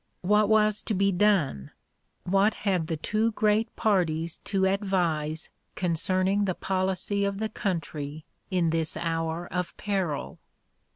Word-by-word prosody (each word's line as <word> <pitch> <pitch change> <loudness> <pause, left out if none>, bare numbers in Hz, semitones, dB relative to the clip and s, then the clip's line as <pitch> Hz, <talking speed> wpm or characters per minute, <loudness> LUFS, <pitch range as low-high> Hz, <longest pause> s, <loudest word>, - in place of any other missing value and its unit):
What 210 +2 +3
was 215 -1 +3
to 215 - -2
be 195 +1 +3
done? 175 - +2 0.5
What 195 +4 +2
had 185 -6 0
the 160 - -2
two 215 +7 0
great 215 +1 +1
parties 170 -6 0
to 195 -2 +1
advise 175 -6 0 0.2
concerning 185 +3 +1
the 185 -2 -1
policy 190 +1 -1
of 200 0 -1
the 220 +1 -2
country 155 -7 -4 0.2
in 175 -4 +1
this 160 -1 0
hour 165 0 -2
of 180 -1 -3
peril? 190 -8 -2
185 Hz, 130 wpm, -27 LUFS, 165-205 Hz, 0.5 s, What